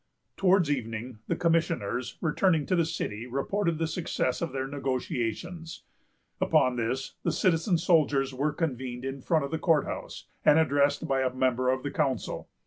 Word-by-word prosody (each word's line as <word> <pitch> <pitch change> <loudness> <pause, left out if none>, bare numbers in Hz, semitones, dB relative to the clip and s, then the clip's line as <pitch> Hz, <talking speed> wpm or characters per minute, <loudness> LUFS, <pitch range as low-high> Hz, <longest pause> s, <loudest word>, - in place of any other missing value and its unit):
Towards 185 -5 +3
evening, 115 -2 -4
the - - 0
commissioners, 165 - 0
returning 160 -1 +2
to 185 - +1
the 170 -2 +3
city, 120 -8 -4
reported 165 +7 -1
the 165 - 0
success 160 -6 -1
of 165 -4 -2
their 135 0 -2
negotiations. 135 - -3 0.6
Upon 130 -1 +3
this, 125 +3 -2
the - - 0
citizen 175 0 +2
soldiers 150 -6 +2
were 145 +4 0
convened 130 -6 -3
in 135 0 -4
front 155 +1 +1
of 140 - -7
the 160 - -1
court 160 -4 +3
house, - - -6 0.2
and 150 - +6
addressed 145 -2 +2
by 135 -1 +1
a 130 -1 +1
member 130 -1 +1
of 130 0 0
the 145 - -3
council. 130 -5 -2
140 Hz, 165 wpm, -28 LUFS, 130-165 Hz, 0.6 s, and